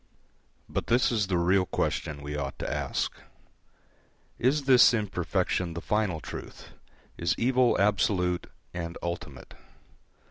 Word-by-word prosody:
But - - -3
this 120 +2 +3
is 105 -4 +1
the 90 -2 +1
real 90 +2 +3
question 70 -2 -2
we 75 +1 -5
ought 70 -2 -4
to - - -4
ask: - - -2 1.3
Is 140 +4 +2
this 125 -2 +7
imperfection 90 -4 -1
the - - -3
final 105 -4 0
truth, - - -9 0.5
is 85 0 +1
evil 125 0 +3
absolute 95 -3 +1 0.3
and 85 -1 -5
ultimate? 85 -6 -6
90 Hz, 120 wpm, -28 LUFS, 85-110 Hz, 1.3 s, this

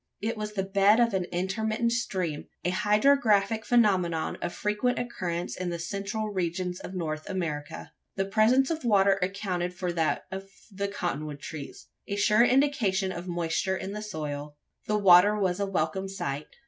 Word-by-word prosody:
It 225 +2 -2
was 210 -1 -5
the 195 -2 -1
bed 200 +3 +4
of 235 -2 +3
an 185 -2 0
intermittent 215 +6 -1
stream 185 -10 -2 0.2
a 180 - +2
hydrographic 210 0 +3
phenomenon 185 -10 +2
of - - -2
frequent 210 +6 -1
occurrence 180 -8 -3
in 185 -1 -3
the 170 - -3
central 200 +5 -3
regions 180 -1 -2
of 190 - -8
North 155 -3 -4
America. 155 -6 -4 0.2
The 195 - 0
presence 230 +8 +3
of 320 -2 -3
water 200 -4 +4
accounted 180 -2 -2
for 180 -1 -2
that 160 -2 0
of 195 +1 -6 0.2
the 200 +1 -2
cotton 175 -7 -3
wood 145 -1 -7
trees 145 -1 -8 0.2
a 200 - -2
sure 210 +3 +4
indication 245 -8 +2
of 175 0 -6
moisture 175 +2 -1
in 190 - -5
the 210 - -5
soil. 150 -7 -5 0.3
The 210 - +2
water 200 +1 +6
was 185 -2 0
a 200 - 0
welcome 190 +2 -1
sight. 155 -7 -4
195 Hz, 170 wpm, -28 LUFS, 175-210 Hz, 0.3 s, water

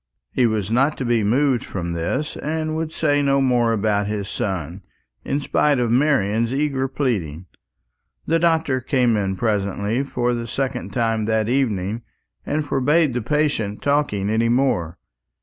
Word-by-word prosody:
He 125 -2 +3
was 110 -2 -2
not 135 +6 +2
to 130 - -3
be 120 -2 +2
moved 130 +4 +2
from 85 -3 -4
this, 85 - -2
and 155 +1 -2
would 160 0 -3
say 145 -3 +1
no 140 -1 +2
more 125 -3 +2
about 105 -2 +1
his 105 -2 -3
son, 95 -6 -4 0.4
in 140 - -1
spite 145 0 +2
of 120 -2 0
Marian's 115 -4 +2
earnest 135 -1 -1
pleading. 95 - -2 0.8
The 165 +1 +2
doctor 160 -6 +1
came 125 -2 +2
in 95 -2 -1
presently, 105 +2 -1
for 125 -3 -1
the 115 -1 -3
second 130 +1 -3
time 115 -3 0
that 110 -1 +1
evening, 115 -5 0 0.5
and 150 +1 -1
forbade 145 +2 +2
his 125 -2 -2
patient's 140 -8 0
talking 140 -9 +1
any 115 +1 +2
more. 115 -10 +1
120 Hz, 155 wpm, -21 LUFS, 105-140 Hz, 0.8 s, He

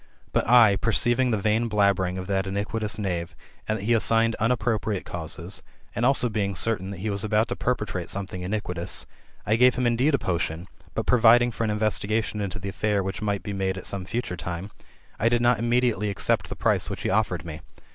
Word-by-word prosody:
But - - +1
1, 115 -4 +6
perceiving 120 +4 +2
the 110 - +1
vain 110 +3 +1
blabbering 100 -3 +2
of 95 - -4
that 95 0 -1
iniquitous 105 +2 -2
knave, 90 -4 -3 0.3
and 110 - 0
that 100 - -7
he 115 - 0
assic^ned 115 0 +3
unappropriate 110 -3 0
causes, 85 +2 -6 0.3
and 115 - -2
also 130 -2 +2
being 100 -3 -2
certain 95 -1 0
that 95 -2 -7
he 110 +1 -2
was 100 0 0
about 110 +2 +1
to - - -2
perpetrate 105 -8 -2
something 95 -2 -4
iniquitous, 90 -3 -2 0.4
I 110 +3 +2
gave 125 0 +5
him 125 0 0
indeed 125 +5 +3
a - - +2
potion, 85 -3 -2 0.3
but - - -1
providing 120 0 +5
for 115 +1 -2
an - - -1
investigation 105 0 -1
into 100 +1 -3
the 100 -1 -5
affair 105 0 0
which 95 +3 -4
might 100 -2 -1
be 100 - -4
made 95 -1 -1
at 95 - -7
some 95 -2 -4
future 110 -3 -3
time, 90 +3 -6 0.5
I 115 - +3
did 120 0 +2
not 120 -2 +3
immediately 120 -2 +1
accept 100 - 0
the - - -5
price - - +1
which - - -5
he - - 0
offered 95 -7 0
me. 80 -2 -7
105 Hz, 205 wpm, -25 LUFS, 95-115 Hz, 0.5 s, 1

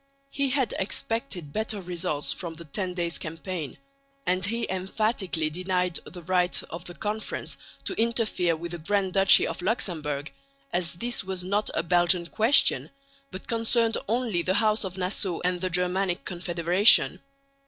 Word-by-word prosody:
He 280 -1 0
had 265 -2 +1
expected 190 - -3
better 220 -1 -2
results 175 -5 -1
from 170 -3 -6
the 170 +1 -10
Ten 180 +4 -3
Days' 170 -2 -1
Campaign, 165 -1 -5 0.5
and 185 +1 +1
he 230 +5 0
emphatically 190 -4 -1
denied 180 +1 0
the 175 -1 -10
right 180 +1 +1
of 170 +1 -7
the 175 - -8
Conference 215 +3 -3 0.3
to - - -2
interfere 220 -7 +1
with 170 +1 -6
the 175 - -5
Grand 190 +3 0
Duchy 195 0 +7
of - - -4
Luxemburg, 155 - -2 0.4
as 175 -1 +1
this 240 +7 -2
was 185 -1 -4
not 200 +3 0
a - - +1
Belgian 175 0 +3
question, 225 +10 +4 0.4
but 185 0 -9
concerned 230 0 +1
only 225 -5 0
the 185 +2 0
House 215 +1 +3
of 190 -1 -5
Nassau 185 -1 0
and 180 0 0
the 185 - 0
Germanic 180 +1 0
Confederation. 175 +3 +4
185 Hz, 155 wpm, -27 LUFS, 175-210 Hz, 0.5 s, Duchy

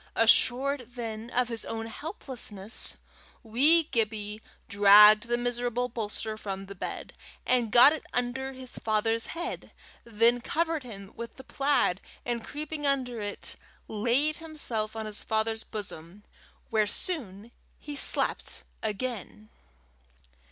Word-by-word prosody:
Assured 250 +2 +3
then 225 -1 -5
of 245 0 +1
his 230 -1 -3
own 225 0 -4
helplessness, 225 - -5 0.5
wee 280 +9 +4
Gibbie 215 -5 -2 0.3
dragged 210 +1 +8
the 240 0 +1
miserable 245 0 -1
bolster 220 -1 -4
from 195 -2 -5
the 200 - -8
bed, 190 - -6 0.3
and 245 -3 +2
got 245 +6 +8
it 315 - -5
under 260 +2 -2
his 255 -1 -8
father's 225 +1 +1
head; 345 +2 -5 0.3
then 235 +2 +2
covered 325 +3 0
him 200 -6 -10
with 235 0 -7
the 265 - -11
plaid, 270 -9 +1 0.2
and 235 -2 -2
creeping 295 0 -4
under 250 -5 0
it, 205 0 -3 0.3
laid 245 +8 +1
himself 245 -10 -4
on 220 -1 -4
his 210 -1 -5
father's 220 0 -1
bosom, 195 -2 -7 0.5
where 215 -2 +3
soon 225 - -3 0.3
he 295 -1 -7
slept - - +1 0.2
again. 215 -1 -4
230 Hz, 125 wpm, -28 LUFS, 215-260 Hz, 0.5 s, dragged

